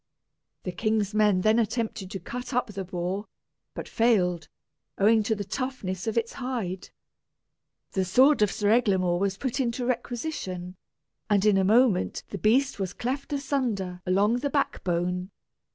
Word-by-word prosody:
The 180 - -3
king's 215 +1 0
men 210 -3 +3
then 215 +4 +4
attempted 225 -3 -2
to 195 - -5
cut 245 +8 -6
up 250 - +2
the 195 0 -4
boar, 185 +3 -3 0.5
but - - -6
failed, 180 -8 +2 0.5
owing 220 +3 +5
to 220 +1 0
the 205 - -4
toughness 205 -4 -4
of 220 - -1
his 230 0 0
hide. 230 -9 -4 1.0
The 190 - 0
sword 260 +9 +4
of 210 -2 +4
Sir 205 0 +1
Eglamour 190 -7 +2
was 195 0 0
put 265 +3 -2
into 245 -1 -1
requisition, 235 - -3 0.5
and 205 -1 +3
in 210 -2 +5
a 195 - +3
moment 215 -1 +3
the 200 - -5
beast 255 +3 +2
was 190 -3 -2
cleft 270 +4 -3
asunder 245 -11 -2
along 205 +5 +3
the 285 +2 -1
back 280 0 -1
bone. 180 +1 -1
210 Hz, 155 wpm, -27 LUFS, 185-245 Hz, 1.0 s, owing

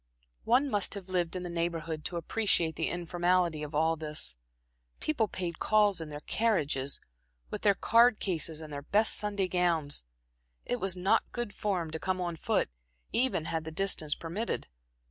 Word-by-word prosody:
One 255 +5 +4
must 205 -5 +1
have 195 -2 -8
lived 175 -2 0
in 180 - -3
the 175 - -4
Neighborhood 165 -2 -2
to 175 - -2
appreciate 170 -3 +1
the 165 - -1
informality 175 -1 +1
of 150 0 -5
all 160 +2 +3
this. 150 - -2 0.6
People 260 -8 +1
paid 175 -4 -4
calls 210 -4 +3
in 160 - -6
their 145 0 -7
carriages, 150 -11 0 0.5
with - - -4
their 200 -1 +4
card 230 +1 +5
cases 165 -4 -1
and 155 -2 -8
their 140 - -4
best 210 +9 +3
Sunday 205 -2 0
gowns 170 - +1 0.6
it 245 - -1
was 190 -3 0
not 185 +2 +2
good 240 -4 -3
form 185 -6 -1
to 160 - -3
come 185 +4 -1
on 175 -2 -2
foot, 155 - 0 0.4
even 245 -10 +2
had 160 -1 -2
the 160 - -5
distances 160 -3 0
permitted. 185 +8 -3
175 Hz, 170 wpm, -30 LUFS, 160-205 Hz, 0.6 s, card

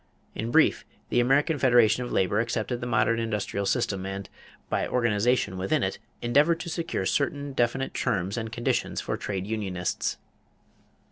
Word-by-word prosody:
In 110 - -3
brief, - - +4 0.3
the - - +2
American 140 +5 +3
Federation 120 -2 +4
of 120 - -6
Labor 95 +3 +2
accepted 115 +1 -2
the 120 - -3
modern 115 0 +2
industrial 105 -3 -2
system 100 -5 0
and, 95 0 -5 0.4
by - - 0
organization 115 -4 +1
within 95 +1 +1
it, - - -2 0.2
endeavored 145 +8 +3
to 175 - -5
secure 165 +1 -2
certain 145 0 -1
definite 130 +2 0
terms 95 +1 -1
and 115 -2 -4
conditions 120 +1 -1
for - - -2
trade 95 -2 -4
unionists. 100 -5 -2
115 Hz, 150 wpm, -27 LUFS, 100-125 Hz, 0.4 s, brief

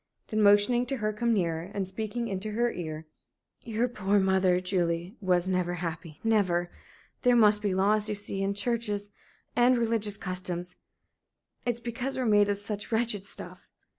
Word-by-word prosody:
Then, 215 -1 0
motioning 210 +4 +5
to 270 - -1
her 215 -2 -1
to 210 - -15
come 235 0 +2
nearer, 170 -4 0
and 195 -2 -1
speaking 220 +4 -3
into 200 +1 -4
her 240 +2 +1
ear: 160 -2 -6 0.6
"Your 230 +1 -1
poor 205 -4 0
mother, 190 -1 +3
Julie, 180 0 -1
was 180 -2 +2
never 180 -1 0
happy 165 -2 -6
never! 185 -6 +2 0.5
There 245 -1 +4
must 210 -2 +5
be 200 -3 0
laws, 210 +3 +2
you 210 - -1
see 200 -1 -3
and 195 +1 0
churches 210 -2 -2 0.4
and 245 +1 +5
religious 220 -3 +1
customs. 180 -1 -4 0.9
It's 240 -1 0
because 245 +3 -4
we're 255 - 0
made 205 -2 +4
of 200 - +1
such 205 +2 -4
wretched 220 -3 0
stuff. - - -10
205 Hz, 165 wpm, -28 LUFS, 185-225 Hz, 0.9 s, motioning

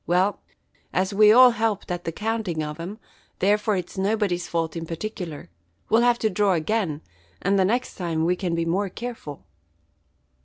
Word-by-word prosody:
Well, 185 +4 +2 0.5
as 185 +2 0
we 210 +1 +7
all 250 +2 +8
helped 220 -4 -1
at 175 0 -4
the 165 - -1
counting 210 -4 -2
of 150 +1 -6
'em, 185 +6 -6 0.4
therefore 210 +2 +2
it's 180 +1 -5
nobody's 195 -3 0
fault 165 -1 -2
in 165 -1 -5
particular. 165 - -6 0.4
We'll 225 - +4
have 240 0 +4
to - - +4
draw 200 0 +2
again, 170 -2 -1 0.4
and 195 +1 +1
the 190 - +4
next 245 +6 0
time 165 -3 -1
we 180 +1 +2
can 175 -2 -2
be 165 0 -1
more 190 +4 0
careful." 225 - -7
190 Hz, 170 wpm, -24 LUFS, 170-215 Hz, 0.5 s, all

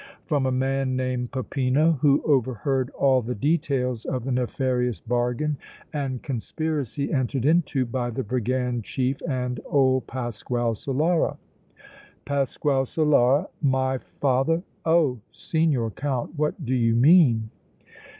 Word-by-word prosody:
"From 145 -5 +1
a - - +1
man 135 0 0
named 130 -1 -2
Peppino, 135 +4 +1
who 140 -2 +4
overheard 130 -1 +1
all 130 -2 +4
the 125 +2 -4
details 135 -3 0
of 130 -3 -2
the 135 - -3
nefarious 125 -3 0
bargain 125 - -1 0.3
and 135 -4 -3
conspiracy 140 +2 -3
entered 130 -1 0
into 150 -4 +2
by 120 0 -2
the 130 +3 -3
brigand 125 +1 -1
chief 130 +4 -1
and 125 -3 -2
old 130 -2 +2
Pasquale 120 -1 -2
Solara." 150 +9 0 0.9
"Pasquale 140 0 0
Solara? 145 +1 +3
My 130 -2 +1
father! 140 +7 0 0.2
Oh! 160 -7 +3
Signor 150 -9 0
Count, 135 0 -3
what 150 +1 -2
do 125 - -1
you 115 -2 +2
mean?" 120 -5 +5
130 Hz, 120 wpm, -25 LUFS, 125-145 Hz, 0.9 s, mean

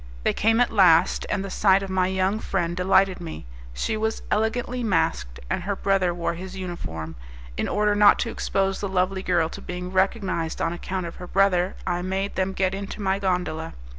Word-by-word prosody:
They - - +2
came 225 +2 +2
at 245 - +3
last, 180 -4 +4
and 195 -2 -1
the 195 - -6
sight 195 0 +3
of 195 - -5
my 185 -1 +2
young 190 +2 0
friend 175 -5 -2
delighted 190 0 +3
me. 160 - -7 0.3
She - - -2
was 220 +1 -2
elegantly 240 +3 0
masked, 65 - 0
and - - -1
her 200 +3 -2
brother 195 -2 +1
wore 170 0 -2
his 185 +2 -8
uniform. 80 - -6 0.4
In - - -1
order 210 0 +2
not 205 0 +6
to 230 - -4
expose 195 0 -1
the 200 - -2
lovely 190 0 0
girl 175 -3 +1
to - - -9
being 180 +1 -6
recognized 190 -3 0
on 165 - 0
account 185 +1 -4
of 170 - -7
her 180 - -8
brother, 190 -1 +2
I 175 0 -1
made 190 +2 -2
them 190 0 -1
get 190 0 0
into 200 +2 -6
my 195 -1 0
gondola. 180 -4 -2
190 Hz, 195 wpm, -24 LUFS, 175-195 Hz, 0.4 s, not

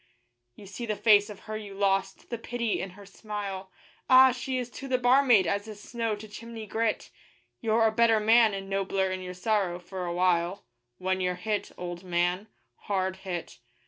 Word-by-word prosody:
You 205 - -13
see 230 +5 -7
the 215 - -1
face 205 -1 +5
of 205 - -10
her 215 - -6
you 205 -2 -7
lost, 195 +1 0
the 235 - -3
pity 235 -1 -2
in 190 - -4
her 200 - -12
smile 200 -2 -6 0.4
Ah! 260 0 +8
she 255 +1 -3
is 245 -1 -4
to 270 - -8
the 260 -1 +2
barmaid 245 -5 +5
as 200 +4 -1
is 215 -1 -9
snow 230 0 -2
to 210 +1 -10
chimney 225 +1 -8
grit; 220 +1 -1 0.5
You're 225 0 +2
a 220 - +4
better 225 0 +4
man 220 -1 +5
and 195 0 -6
nobler 195 -1 0
in 185 0 -3
your 180 0 -7
sorrow, 190 -2 0
for 180 +1 -6
a 170 - -2
while, 180 +1 +1 0.3
When 185 0 -1
you're 180 0 0
hit, 205 +3 -3
old 175 0 -6
man 180 +3 0 0.4
hard 190 -2 -1
hit. 185 -3 -6
205 Hz, 190 wpm, -28 LUFS, 185-225 Hz, 0.5 s, Ah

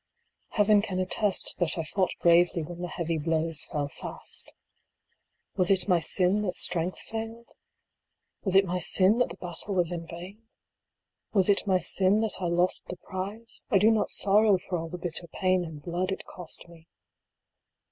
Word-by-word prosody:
Heaven 210 -1 +4
can 200 -3 -4
attest 190 +2 0
that 175 -2 +1
I 165 - -1
fought 185 +4 -1
bravely 170 -1 +4
when 175 +2 -8
the 180 - -3
heavy 170 -2 -3
blows 160 0 +1
fell 145 -1 -3
fast 145 - -4 1.0
Was 180 -1 +3
it 195 -1 +3
my 180 -3 +3
sin 185 +4 +2
that 185 -3 -2
strength 175 +1 +1
failed? 225 +1 -7 0.9
Was 190 -2 0
it 195 0 +6
my 180 0 -2
sin 190 +6 +3
that 245 - +2
the 170 - -9
battle 180 +3 -5
was 175 -2 +1
in 165 -1 -5
vain? 180 +6 -10 0.9
Was 195 -2 +3
it 200 +1 +2
my 190 -1 +4
sin 190 +3 +2
that 220 -2 -1
I - - -1
lost 175 +2 +1
the 180 - -7
prize? 200 +6 -6
I 200 - +4
do 210 +4 +5
not 220 - +1
sorrow 205 0 +4
for 180 0 -5
all 165 0 -6
the 180 - -6
bitter 170 0 -3
pain 185 +2 0
and 155 -3 -9
blood 180 +2 -2
it 190 - -5
cost 175 -1 -7
me. 165 -1 -17
180 Hz, 175 wpm, -27 LUFS, 170-200 Hz, 1.0 s, it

